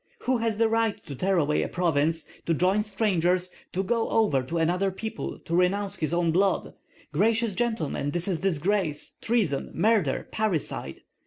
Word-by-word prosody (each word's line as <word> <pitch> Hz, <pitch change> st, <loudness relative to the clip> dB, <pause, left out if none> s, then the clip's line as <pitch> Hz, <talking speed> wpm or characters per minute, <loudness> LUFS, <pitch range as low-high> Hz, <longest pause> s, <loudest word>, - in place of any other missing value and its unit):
Who 255 Hz, 0 st, +1 dB
has 225 Hz, -2 st, 0 dB
the 225 Hz, 0 st, +4 dB
right 225 Hz, -2 st, +1 dB
to 140 Hz, -, -7 dB
tear 190 Hz, +8 st, +1 dB
away 150 Hz, -2 st, +2 dB
a -, -, -1 dB
province, 165 Hz, -2 st, 0 dB, 0.2 s
to 165 Hz, -, +2 dB
join 185 Hz, +5 st, +3 dB
strangers, 185 Hz, -4 st, +1 dB, 0.2 s
to 190 Hz, -, -1 dB
go 230 Hz, +3 st, 0 dB
over 205 Hz, -12 st, +2 dB
to 145 Hz, +7 st, -4 dB
another 180 Hz, +4 st, +1 dB
people, 220 Hz, +4 st, -5 dB
to 170 Hz, -, -1 dB
renounce 195 Hz, +2 st, +1 dB
his 155 Hz, -2 st, -1 dB
own 170 Hz, -1 st, +2 dB
blood? 190 Hz, +3 st, +1 dB, 0.4 s
Gracious 220 Hz, +6 st, +2 dB
gentlemen, 185 Hz, -, -1 dB
this 175 Hz, +4 st, -1 dB
is 180 Hz, -5 st, 0 dB
disgrace, 180 Hz, -2 st, 0 dB
treason, 205 Hz, -, 0 dB
murder, 195 Hz, -6 st, +2 dB
parricide! 175 Hz, -, -2 dB
185 Hz, 165 wpm, -26 LUFS, 165-215 Hz, 0.4 s, the